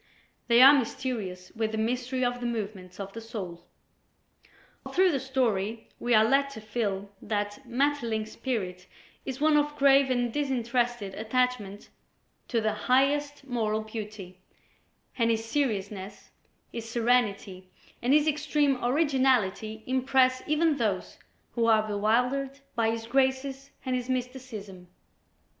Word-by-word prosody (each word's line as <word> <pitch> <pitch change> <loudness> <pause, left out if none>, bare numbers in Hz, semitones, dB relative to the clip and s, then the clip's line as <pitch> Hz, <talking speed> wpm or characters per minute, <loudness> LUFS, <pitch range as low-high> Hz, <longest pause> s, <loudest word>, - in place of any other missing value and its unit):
They 235 +1 +7
are 275 +2 +10
mysterious 225 -8 -2
with 220 -1 -1
the - - -1
mystery 250 +3 -1
of 245 0 -1
the 240 - -2
movements 200 -5 -5
of 195 0 -6
the 230 - -7
soul. 190 -7 -7 1.2
All - - -8
through 370 0 +4
the 275 - 0
story 230 -5 -1
we 240 -1 +2
are 215 0 +6
led 275 +4 +3
to - - -8
feel 205 -3 -3
that 205 +4 -3
Maeterlinck's 235 -4 0
spirit 185 -8 -4 0.4
is 265 0 -4
one 305 0 +4
of 295 0 0
grave 275 -1 +5
and 245 -2 0
disinterested 240 -6 -1
attachment 220 -2 -1 0.6
to 235 - +1
the 215 -1 +1
highest 280 +5 +1
moral 220 -4 -1
beauty, 215 -4 -8 0.8
and 230 0 +3
his 225 0 0
seriousness, 205 -7 -3 0.4
his 230 -1 -6
serenity 220 -6 0 0.3
and 245 - +1
his 300 +1 +5
extreme 295 -3 +1
originality 250 -6 +1
impress 260 0 +2
even 305 0 +2
those 210 -7 -2 0.3
who 230 -1 0
are 215 -1 +4
bewildered 250 +7 0
by 230 -2 +1
his 225 0 -3
graces 265 +2 0 0.2
and 255 -1 0
his 250 0 -3
mysticism. 245 -8 -5
240 Hz, 135 wpm, -28 LUFS, 215-265 Hz, 1.2 s, are